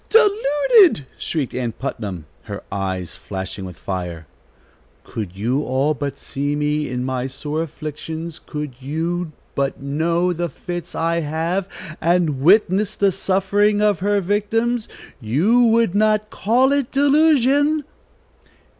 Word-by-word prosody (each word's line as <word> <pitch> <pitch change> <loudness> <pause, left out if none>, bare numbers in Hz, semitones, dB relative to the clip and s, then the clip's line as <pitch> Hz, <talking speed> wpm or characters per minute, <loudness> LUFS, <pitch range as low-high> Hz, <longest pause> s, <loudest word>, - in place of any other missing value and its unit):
"Deluded!" 410 - +4
shrieked 150 -6 -2
Ann 120 -3 -2
Putnam, 100 - -5 0.2
her - - -6
eyes 95 -3 -3
flashing 95 0 -6
with 90 -3 -9
fire. 90 -4 -5 0.8
"Could 100 -5 -6
you 120 +7 0
all 135 +2 +1
but 140 -1 -4
see 145 +1 -3
me 150 0 0
in 125 0 -2
my 130 -1 -2
sore 150 +4 -4
afflictions, 160 +1 -6
could 150 -3 -6
you 165 +5 -2 0.2
but 140 0 -1
know 165 +6 0
the 175 0 -2
fits 175 0 -6
I 165 +1 +1
have, 165 +5 -2 0.3
and 165 -5 +2
witness 200 +4 +4
the 200 -1 +3
suffering 195 +2 +1
of 210 -1 +2
her 205 +1 +1
victims, 220 +4 0 0.3
you 170 - +3
would 230 -4 +3
not 215 0 +2
call 250 +6 +2
it 280 -3 0
delusion." 290 +1 +3
170 Hz, 130 wpm, -21 LUFS, 135-210 Hz, 0.8 s, Deluded